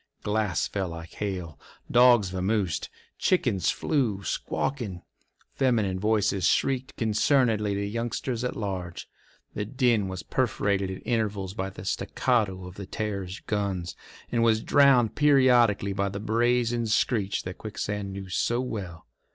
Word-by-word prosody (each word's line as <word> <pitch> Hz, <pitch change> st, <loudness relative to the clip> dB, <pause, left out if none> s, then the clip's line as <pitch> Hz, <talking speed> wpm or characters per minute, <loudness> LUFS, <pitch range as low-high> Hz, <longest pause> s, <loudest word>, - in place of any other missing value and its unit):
Glass 105 Hz, -5 st, 0 dB
fell 95 Hz, -2 st, -2 dB
like 85 Hz, 0 st, -8 dB
hail; 90 Hz, -7 st, -4 dB, 0.3 s
dogs 120 Hz, -6 st, +5 dB
vamosed; 95 Hz, -3 st, -1 dB, 0.3 s
chickens 105 Hz, -, +2 dB
flew, 115 Hz, -10 st, 0 dB
squawking; 105 Hz, -10 st, -3 dB, 0.5 s
feminine 110 Hz, -8 st, +1 dB
voices 100 Hz, -3 st, +2 dB
shrieked 130 Hz, -1 st, 0 dB
concernedly 110 Hz, -2 st, +2 dB
to 100 Hz, 0 st, -1 dB
youngsters 115 Hz, +3 st, -3 dB
at 125 Hz, -, -2 dB
large. 95 Hz, -5 st, -4 dB, 0.5 s
The 105 Hz, -, -2 dB
din 120 Hz, -3 st, +1 dB
was 95 Hz, -1 st, -5 dB
perforated 100 Hz, -5 st, 0 dB
at 95 Hz, -, -7 dB
intervals 105 Hz, -5 st, -1 dB
by 95 Hz, -1 st, -3 dB
the -, -, -10 dB
staccato 105 Hz, -8 st, 0 dB
of 90 Hz, +1 st, -10 dB
the 100 Hz, -2 st, -7 dB
Terror's 100 Hz, -2 st, -4 dB
guns, 100 Hz, -4 st, -2 dB, 0.4 s
and 115 Hz, -, +1 dB
was 110 Hz, -1 st, +3 dB
drowned 135 Hz, -5 st, +5 dB
periodically 125 Hz, -8 st, +4 dB
by 100 Hz, 0 st, 0 dB
the 100 Hz, +1 st, -5 dB
brazen 120 Hz, +2 st, +1 dB
screech 105 Hz, -2 st, +1 dB
that 90 Hz, 0 st, -7 dB
Quicksand 105 Hz, -2 st, -4 dB
knew 95 Hz, 0 st, -7 dB
so 95 Hz, +7 st, 0 dB
well. 95 Hz, -10 st, -5 dB
105 Hz, 135 wpm, -27 LUFS, 95-120 Hz, 0.5 s, dogs